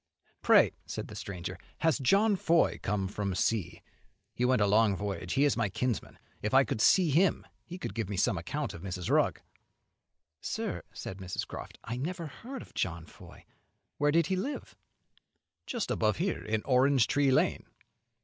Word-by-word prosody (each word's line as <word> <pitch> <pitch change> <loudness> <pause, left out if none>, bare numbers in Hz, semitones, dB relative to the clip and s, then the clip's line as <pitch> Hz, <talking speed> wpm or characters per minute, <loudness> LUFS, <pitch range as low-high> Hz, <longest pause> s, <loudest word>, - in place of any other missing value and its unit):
"Pray," - - +6 0.2
said - - -5
the - - -9
stranger, 90 -3 -6 0.2
"has 160 -4 +2
John 200 - +4
Foy 170 -2 +2
come 105 0 -1
home 95 - -1
from 100 -1 -3
sea? 90 -5 -1 0.5
He 125 - -2
went 125 -1 +3
a 105 - +4
long 105 0 +4
voyage; 100 0 -4
he 135 - +3
is 145 - +2
my 115 -4 0
kinsman. 120 -1 -2 0.2
If 105 +5 -1
I 135 - +7
could 110 - -3
see 175 - +5
him, 175 +6 +3 0.2
he 180 - -7
could 185 - -5
give 115 -4 -3
me 100 - -3
some - - +2
account - - -3
of 85 - -9
Mrs. 90 -2 -4
Rugg." - - +2 1.0
"Sir," - - -3
said 95 - -7
Mrs. 90 -1 -4
Croft, - - -9
"I 115 +2 -4
never 170 +6 -3
heard 245 - -8
of - - -18
John 85 -2 -2
Foy. - - -15 0.5
Where 145 0 +3
did 165 +2 +3
he 190 - 0
live?" 245 +11 -4 0.9
"Just 235 -5 -2
above 110 -1 +1
here, 185 +3 -1
in 110 0 -1
Orange 130 -1 +4
Tree 140 -1 +2
Lane." 130 - +2
125 Hz, 180 wpm, -30 LUFS, 100-165 Hz, 1.0 s, I